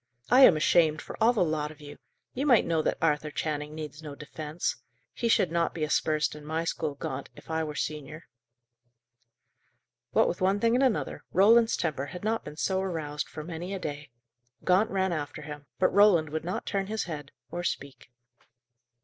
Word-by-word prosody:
"I 250 - +7
am 165 - +6
ashamed 155 0 +3
for - - -8
all 225 +2 +6
the 225 -6 +2
lot 155 -2 -1
of 155 0 -13
you! 145 -1 -11 0.3
You 275 +4 -1
might 245 -6 +5
know 165 -1 +1
that - - 0
Arthur 150 -1 +1
Channing 150 0 -3
needs 155 -1 -7
no 150 -2 -8
defence. 150 +2 -4 0.4
He 235 - -1
should 190 -6 +3
not 170 0 0
be 160 - -2
aspersed 155 0 +1
in 150 0 -10
my 160 +2 -2
school, 155 -3 -2
Gaunt, - - -5
if - - -11
I 160 0 0
were 150 -1 -5
senior." 155 +1 -4 1.9
What - - +3
with 175 - -3
one 190 +2 +2
thing 230 +2 +3
and 255 +3 +3
another, 255 -5 0
Roland's 225 +4 +5
temper 145 -4 -2
had 180 +3 -8
not 225 +1 0
been 150 0 -9
so 190 +2 0
aroused 155 -6 -3
for 155 - -7
many 175 +4 -5
a - - -4
day. 145 -3 -6 0.5
Gaunt 190 +5 +3
ran 190 -2 0
after 150 -1 -5
him, 145 -1 -9
but - - +2
Roland 190 -6 +5
would 155 0 -3
not 180 +2 -3
turn 195 -1 -1
his 220 0 -2
head, 150 -4 -7 0.2
or 175 - -4
speak. 140 -6 -4
160 Hz, 190 wpm, -28 LUFS, 150-190 Hz, 1.9 s, I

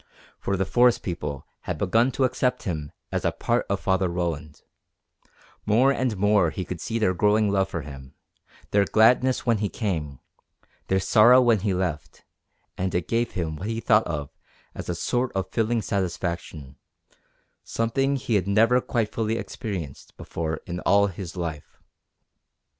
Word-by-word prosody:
For 100 - -1
the 95 - 0
forest 120 +4 +3
people 75 -6 -4 0.2
had - - -3
begun 115 +7 +2
to 135 - 0
accept 125 0 0
him 75 -5 -4 0.2
as - - -2
a - - +2
part - - -1
of - - -1
Father 95 -1 +1
Roland; 80 -4 -4 1.0
more 120 +6 +4
and 130 -6 -1
more 105 -3 +3
he 90 +3 -5
could 90 -2 -6
see 115 - -2
their 105 -5 +2
growing 105 +2 +2
love 95 -1 +1
for 85 -5 -4
him, 70 -2 -11 0.6
their 100 0 +4
gladness 125 +5 +3
when 115 -3 +2
he 105 -1 -1
came, 80 - -3 0.7
their 95 - +2
sorrow 120 +6 +6
when 120 -4 +4
he 100 +1 -1
left, 85 -6 -4 0.5
and 95 -1 -1
it 90 -2 -1
gave 115 0 0
him 80 -5 -3
what 95 - -5
he 115 0 -2
thought 110 -2 +3
of 75 -4 -4 0.4
as - - -7
a 90 - -1
sort 125 +8 -1
of 95 -1 -2
filling 115 0 0
satisfaction, 85 -7 -3 0.9
something 135 +5 0
he 120 -3 -3
had 100 -3 +1
never 115 +5 +4
quite 115 -4 -1
fully 110 0 -1
experienced 90 - -6
before 80 -1 -4
in 90 0 -5
all 100 +2 +4
his 95 -2 -6
life. 80 -4 -5
100 Hz, 165 wpm, -25 LUFS, 85-115 Hz, 1.0 s, sorrow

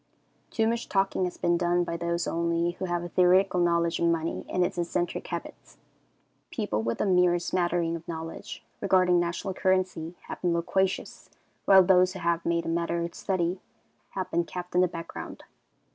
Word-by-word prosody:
Too 220 -1 +1
much 235 +1 -2
talking 195 -1 +1
has 180 - -5
been 175 0 +1
done 175 0 +2
by 170 - -4
those 170 0 -1
only 170 +1 0
who 180 +2 -5
have 175 -1 -2
a 175 - -6
theoretical 180 +1 +4
knowledge 170 -1 +2
of 170 - +2
money 165 -1 -1
and 180 -1 +2
its 175 - -4
eccentric 175 0 -2
habits. - - -7 0.7
People 105 +1 -2
with 115 +1 -2
a - - +2
mere 180 -2 +4
smattering 175 -1 0
of 165 0 -9
knowledge 165 -1 -7 0.2
regarding 185 -2 +3
national 175 +2 -2
currency 185 -3 0
have - - -8
been 175 -2 +1
loquacious, 190 +3 -1 0.4
while 190 -1 +8
those 185 0 +4
who 190 - -7
have 170 0 0
made 170 0 0
the - - -4
matter 170 0 -1
a 170 - -5
study, 180 -1 -1 0.6
have 190 - -3
been 170 +1 +2
kept 180 +1 -7
in 180 - +4
the 185 - +4
background. 165 -1 -8
175 Hz, 180 wpm, -27 LUFS, 170-185 Hz, 0.7 s, while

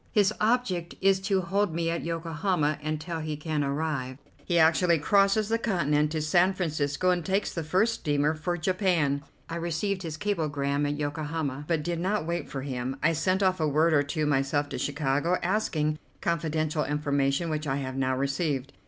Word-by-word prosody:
His 205 -3 +3
object 210 -7 0
is 195 0 +3
to 190 0 +1
hold 190 0 0
me 165 0 0
at 170 - -2
Yokohama 165 -2 -1
until 155 +2 -3
he 155 -1 -4
can 150 -1 -1
arrive. 140 -3 -2 0.3
He 175 - 0
actually 165 +1 +4
crosses 200 +6 +3
the 225 +1 +1
continent 150 -9 +1
to 155 -1 -1
San 175 +5 +3
Francisco, 155 -1 0
and 175 -1 0
takes 195 +4 0
the 165 - -3
first 190 +9 +2
steamer 145 -4 +1
for 165 +3 -2
Japan. 170 -5 +1 0.3
I 165 - -4
received 175 +4 -2
his 160 -3 -5
cablegram 145 -7 -1
at 145 0 -2
Yokohama, 150 -1 -3
but 165 -3 0
did 170 0 -2
not 190 0 0
wait 170 -2 -3
for 135 -2 -5
him. 130 -1 -3
I 165 +2 +4
sent 185 +5 +1
off 185 -1 +2
a 155 - +2
word 155 +3 +3
or 145 - +5
two 150 +2 -2
myself 145 0 +1
to 130 -3 -4
Chicago, 145 +5 0
asking 160 -6 0 0.2
confidential 155 -2 0
information 145 +2 0
which 155 0 -2
I 135 - 0
have 130 -2 -4
now 130 -1 0
received. 140 -1 -1
160 Hz, 180 wpm, -27 LUFS, 145-180 Hz, 0.3 s, or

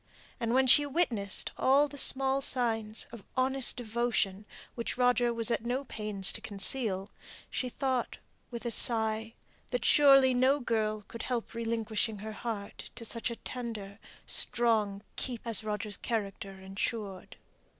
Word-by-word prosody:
And 230 +1 -1
when 265 0 +4
she 270 +3 +8
witnessed 245 - 0
all 280 +3 +4
the 285 0 -5
small 270 +1 +3
signs 225 -5 0
of 235 -4 -10
honest 265 0 +3
devotion 225 -4 -1 0.3
which 235 0 -4
Roger 245 -1 +3
was 230 0 +1
at 230 - 0
no 250 +3 -2
pains 210 -6 +1
to - - -4
conceal, 200 -1 -1 0.4
she 250 - -2
thought, 260 -1 -2 0.3
with 235 0 -6
a 235 - -1
sigh, 225 -1 +1 0.3
that 245 0 -2
surely 275 -3 +6
no 260 +3 +3
girl 215 -4 -1
could 230 - -8
help 245 -3 -3
relinquishing 225 -1 -2
her 215 +2 -7
heart 210 -2 -6
to 235 -1 -7
such 230 +1 -2
tender, 220 -5 -6 0.3
strong 215 -4 +2
keeping 240 -2 -4
as 220 - +4
Roger's 210 0 -2
character 200 -4 -4
ensured. 195 +1 -5
230 Hz, 140 wpm, -30 LUFS, 215-250 Hz, 0.4 s, she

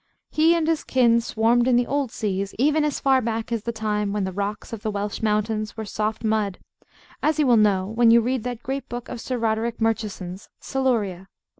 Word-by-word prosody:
He 320 +2 +4
and 325 -2 0
his 325 -2 +1
kin 235 -2 +3
swarmed 235 +2 +2
in 255 - +4
the 245 0 +3
old 280 -1 -1
seas, 200 -2 -3
even 300 +5 +3
as 300 -2 -1
far 265 -1 +3
back 230 0 -3
as 230 -2 -1
the 235 - -3
time 210 -2 -2
when 205 -1 -1
the 190 - -2
rocks 205 +4 -4
of 220 - -5
the 220 - -2
Welsh 205 0 -3
mountains 215 0 -1
were 220 - -4
soft 215 +2 -3
mud; 215 -3 0 0.6
as 310 +1 +1
you 300 - +3
will 245 -2 +5
know 205 -4 +3
when 225 +3 +3
you 230 +1 +7
read 250 +2 0
that 245 0 -5
great 270 +1 -4
book 240 +1 -6
of 235 - -6
Sir 255 - -3
Roderick 230 0 -1
Murchison's, 210 -4 -2
Siluria. 220 -9 -1
225 Hz, 210 wpm, -24 LUFS, 210-250 Hz, 0.6 s, you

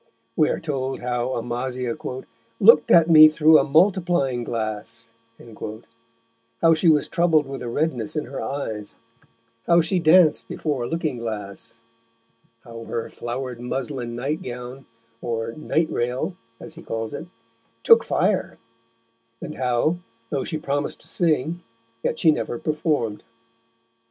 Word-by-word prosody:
We 155 - +3
are - - -1
told 135 -4 -3
how 125 +1 -2
Amasia 120 +1 -3 0.6
"looked 190 -8 +6
at 165 -2 +6
me 155 -2 +9
through 155 0 +5
a - - +2
Multiplying 165 -5 +2
Glass," 115 0 -4 1.5
how 165 0 +5
she 165 +2 +3
was 150 -2 +3
troubled 165 -4 +2
with 135 -1 -7
a 120 - -4
redness 125 -5 -1
in 150 - -2
her 135 +3 -6
eyes, 110 -7 -5 0.7
how 170 0 +5
she 170 +3 0
danced 165 0 +5
before 140 -6 -3
a - - -4
looking 160 -6 -2
glass, 110 0 -6 0.8
how 115 -1 -10
her 115 - -4
flowered 120 0 -5
muslin 125 -1 -4
nightgown 125 -1 -5 0.3
(or 115 -1 -3
"night 155 +4 -1
rail," 125 +9 -2 0.2
as - - -5
he 165 - -11
calls 115 -6 -4
it) 165 - -6 0.6
took 230 0 +7
fire, 190 0 0 0.8
and - - -7
how, 130 +7 0 0.3
though 140 -2 -1
she 155 - -3
promised 145 -1 -3
to - - -11
sing, 165 0 0 0.4
yet 155 - -1
she 160 - +5
never 120 - -3
performed. 150 -7 -1
135 Hz, 135 wpm, -23 LUFS, 120-160 Hz, 1.5 s, me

